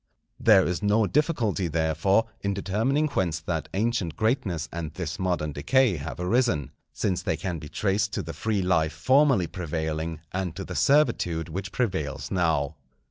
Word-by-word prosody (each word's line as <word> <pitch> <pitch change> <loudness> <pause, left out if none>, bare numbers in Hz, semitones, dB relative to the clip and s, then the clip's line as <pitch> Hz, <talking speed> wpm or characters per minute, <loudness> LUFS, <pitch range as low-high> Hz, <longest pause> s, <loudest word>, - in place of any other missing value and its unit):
There 100 -4 +6
is 90 0 -1
no 105 +1 +3
difficulty, 115 - +1
therefore, 80 +7 +2 0.2
in 100 0 -1
determining 110 +10 +1
whence 85 - 0
that 80 -1 -3
ancient 105 -5 0
greatness 110 - 0
and 80 -3 -4
this 85 0 -4
modern 90 -5 -1
decay 120 - +2
have 70 -1 -6
arisen, 90 - +1 0.2
since 95 -4 -1
they - - -1
can 90 -3 -3
be 75 0 -9
traced 100 0 0
to - - -2
the 80 +1 -6
free 105 -3 -1
life 80 -4 +2
formerly 130 - +3
prevailing 80 -2 -3
and 90 -3 -3
to - - -5
the - - -6
servitude 90 - +2
which 95 +5 -5
prevails 95 - -2
now. 80 -5 +1
90 Hz, 160 wpm, -26 LUFS, 80-110 Hz, 0.2 s, There